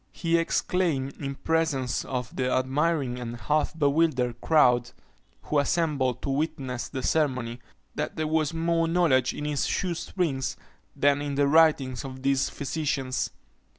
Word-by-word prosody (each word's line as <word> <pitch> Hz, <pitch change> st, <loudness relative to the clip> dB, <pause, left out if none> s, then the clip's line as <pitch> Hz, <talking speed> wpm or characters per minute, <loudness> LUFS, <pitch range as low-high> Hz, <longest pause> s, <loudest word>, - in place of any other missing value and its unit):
He 165 Hz, -1 st, 0 dB
exclaimed, 165 Hz, -5 st, 0 dB
in 140 Hz, -1 st, -3 dB
presence 155 Hz, -6 st, 0 dB
of 125 Hz, -4 st, -4 dB
the 130 Hz, -1 st, 0 dB
admiring 135 Hz, 0 st, 0 dB
and 120 Hz, -1 st, -5 dB
half 150 Hz, +7 st, 0 dB
bewildered 140 Hz, -5 st, +1 dB
crowd, 125 Hz, -6 st, +4 dB, 0.5 s
who 150 Hz, -, +1 dB
assembled 140 Hz, -4 st, 0 dB
to -, -, -2 dB
witness 135 Hz, -4 st, -2 dB
the 130 Hz, -2 st, -5 dB
ceremony, 125 Hz, -7 st, 0 dB, 0.3 s
that -, -, -3 dB
there 155 Hz, -, -1 dB
was 155 Hz, -1 st, +1 dB
more 165 Hz, 0 st, +1 dB
knowledge 155 Hz, -7 st, +3 dB
in 150 Hz, -, -6 dB
his 150 Hz, -2 st, 0 dB
shoe 180 Hz, -2 st, -1 dB
strings 160 Hz, -6 st, -2 dB, 0.4 s
than 145 Hz, 0 st, +3 dB
in 145 Hz, -1 st, -3 dB
the 140 Hz, 0 st, +3 dB
writings 145 Hz, -5 st, +3 dB
of 130 Hz, -1 st, -8 dB
these 135 Hz, -1 st, +2 dB
physicians. 140 Hz, -3 st, -2 dB
140 Hz, 145 wpm, -27 LUFS, 130-160 Hz, 0.5 s, crowd